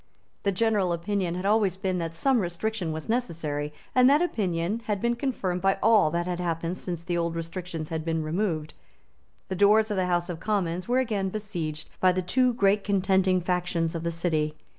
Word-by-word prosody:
The 200 - +1
general 200 -3 +1
opinion 180 0 -1
had 180 +1 -4
always 200 -3 +2
been 190 -1 -1
that 165 -1 -4
some 265 +8 +2
restriction 180 0 -2
was 155 0 -5
necessary; 160 -11 -2 0.2
and 255 0 +6
that 290 +2 +5
opinion 205 - -1
had 205 -2 -1
been 235 +3 +1
confirmed 195 -9 -2
by 195 +1 +2
all 215 -7 +5
that 170 +2 -1
had 180 -1 -3
happened 170 0 -2
since 175 -2 -5
the 175 -1 -1
old 170 0 -1
restrictions 165 -1 -5
had 160 -1 -3
been 165 -1 -1
removed. 160 -1 -2 0.8
The 190 - -2
doors 210 +3 +4
of 205 - -1
the 185 -1 +1
House 175 -1 +1
of 175 -3 -5
Commons 185 -4 -1
were 245 +1 +2
again 215 -7 0
besieged 175 -7 -4
by 185 -1 +4
the 185 0 -1
two 250 +8 +2
great 200 -2 +3
contending 190 -2 +2
factions 175 -2 -1
of 165 - -3
the 170 - -1
City. 160 -2 -1
180 Hz, 195 wpm, -27 LUFS, 165-210 Hz, 0.8 s, and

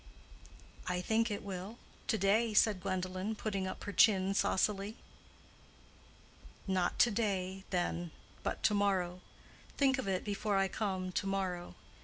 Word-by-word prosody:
"I 180 0 0
think 225 +5 +1
it 205 - -4
will, 195 +3 -6 0.3
to 220 - +2
day," 215 +3 +2
said 210 -3 +4
Gwendolen, 185 +3 -2
putting 200 -3 -2
up - - -6
her 205 - -4
chin 195 -3 +5
saucily. 200 +2 +1 1.7
"Not 185 -2 0
to 240 - +5
day, 195 -3 -1
then, 175 -1 -1 0.3
but - - -3
to 210 - +4
morrow. 185 -3 +1 0.6
Think 270 -1 +3
of 260 - -3
it 185 -1 0
before 205 0 -1
I 195 0 +2
come 190 -4 -2
to 195 - -1
morrow. 185 -3 -2
195 Hz, 140 wpm, -34 LUFS, 185-210 Hz, 1.7 s, chin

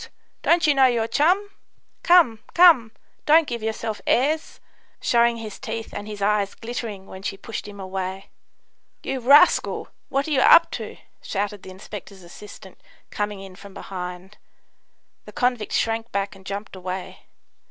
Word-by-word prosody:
don't 335 -1 +3
you 300 - +4
know 270 -1 +5
your 235 -3 +1
chum? 370 - +2 0.5
Come, 335 -11 +5 0.2
come; 325 -11 +6 0.4
don't 320 +2 +6
give 235 -2 -4
yourself 220 0 -4
airs," 300 +5 +1 0.4
showing 235 0 +2
his 220 -3 -8
teeth 225 -3 -6
and 205 +1 -6
his 205 -2 -6
eyes 205 -1 +1
glittering 225 -4 -6
when 190 -1 -11
she 195 0 -4
pushed 220 +1 -7
him 205 -1 -11
away. 190 0 -5 0.7
"You 270 - -3
rascal! 285 +8 +4 0.2
what 275 +2 -1
are - - -4
you 270 -3 +3
up 335 - +7
to?" - - -6 0.2
shouted 205 0 -3
the - - -11
inspector's 190 0 -10
assistant, 190 +1 -13 0.3
coming 205 -1 -3
in 190 -1 -11
from 200 0 -13
behind. 180 +1 -8 0.9
The - - -12
convict 245 -4 -1
shrank 225 0 -1
back 200 0 -2
and 190 -1 -15
jumped 200 0 -6
away. 185 0 -7
215 Hz, 155 wpm, -23 LUFS, 195-255 Hz, 0.9 s, up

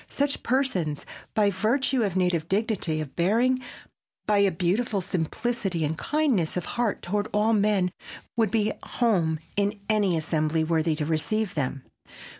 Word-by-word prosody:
Such 285 0 -1
persons, 195 - 0 0.3
by 205 -2 +4
virtue 240 +7 +1
of 200 -5 0
a - - +1
native 175 -3 +1
dignity 190 -6 0
of 145 -3 -7
bearing, 235 +9 +2 0.6
by 210 -1 +3
a 200 -1 +5
beautiful 195 +6 0
simplicity 185 0 -1
and 150 - -1
a - - -10
kindness 265 - +1
of 180 - -2
heart 240 -3 -1
toward 205 +3 -1
all 215 +2 +2
men, 200 -3 +2 0.4
would 225 -3 +2
be 215 +1 +1
at - - -12
home 180 -10 +1 0.2
in 205 +1 0
any 205 -5 +3
assembly 160 0 0
worthy 160 0 +1
to 150 -1 -2
receive 180 +7 -1
them. 135 -2 -2
200 Hz, 160 wpm, -26 LUFS, 165-220 Hz, 0.6 s, a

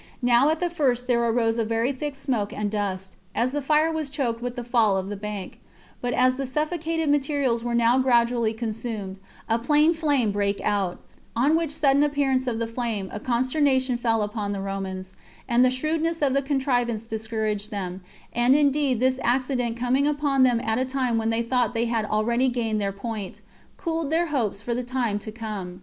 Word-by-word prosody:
Now 245 +4 +5
at 315 0 0
the 355 -1 -1
first 255 -7 +1
there 240 -2 +2
arose 230 0 +1
a - - +2
very 225 +3 0
thick 285 +1 -4
smoke 245 -7 -2
and 210 -1 -2
dust, 190 -3 -3 0.2
as 245 +2 +1
the 290 +1 -2
fire 305 +3 +3
was 315 -3 -3
choked 250 -5 -2
with 245 0 -4
the 245 - -4
fall 230 -5 +2
of 190 +1 -3
the 205 - -4
bank; 205 -1 -6 0.4
but 245 - -1
as 255 +1 +3
the 270 -1 -3
suffocated 320 +3 -1
materials 275 -4 +1
were 240 0 -1
now 235 +2 +4
gradually 235 -3 +3
consumed, 220 -3 -5 0.3
a 225 0 +1
plain 300 +6 +4
flame 290 -9 +1
brake 200 0 0
out; 200 -4 0 0.4
on 275 +7 +3
which 330 -1 0
sudden 285 -2 +3
appearance 280 -3 +1
of 235 -2 -1
the 230 - -1
flame 225 -4 -3
a 210 - -4
consternation 260 +2 +1
fell 230 -2 +1
upon 205 -1 -3
the 200 - -3
Romans, 190 -1 -5 0.3
and 240 0 +4
the 255 - +5
shrewdness 315 +5 -1
of 270 -2 +3
the 275 - +2
contrivance 245 -5 0
discouraged 220 -2 -3
them; 190 -3 -5 0.3
and 240 +3 +4
indeed 285 -3 +2
this 260 +1 +2
accident 250 -1 0
coming 255 +4 +1
upon 290 -2 +1
them 245 -2 +4
at 225 0 0
a - - +2
time 255 -3 0
when 225 0 0
they 225 +1 +1
thought 245 0 0
they 230 +1 +1
had 230 -2 0
already 235 +5 +1
gained 225 -3 -1
their 200 -1 0
point, 205 -1 -6 0.4
cooled 325 -4 -2
their 330 +2 +2
hopes 215 -6 -1
for 235 - -2
the 250 +1 -2
time 240 -4 -1
to 215 - -7
come. 210 -5 -6
240 Hz, 200 wpm, -25 LUFS, 220-275 Hz, 0.4 s, Now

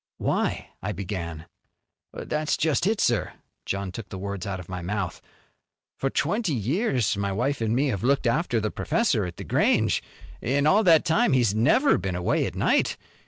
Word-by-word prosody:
"Why - - -1
" - - -46
I - - -3
began. 85 -4 -5 0.7
"That's 155 0 -2
just 160 +3 +1
it, 215 0 +1
sir." 120 -3 +1 0.3
John 100 -1 -2
took 105 +1 -8
the 95 - -6
words 100 -1 -5
out 95 -1 -3
of 90 - -10
my 90 -1 -5
mouth. 95 0 -3 0.8
"For 135 - 0
twenty 175 - 0
years 125 - 0
my 100 0 -2
wife 125 +7 -1
an' 110 0 +1
me 140 +3 +2
have 100 -6 -2
looked 135 +1 +2
after 120 -1 +1
the 110 -1 -2
professor 140 - 0
at 85 -1 -7
The - - -6
Grange. - - +2 0.4
In 140 +4 +1
all 200 +8 +5
that 165 -2 +6
time 185 - +3
he's 120 -6 +3
never 190 - +3
been 95 -2 -3
away 90 0 +1
at - - -7
night. - - +1
115 Hz, 185 wpm, -25 LUFS, 100-150 Hz, 0.8 s, that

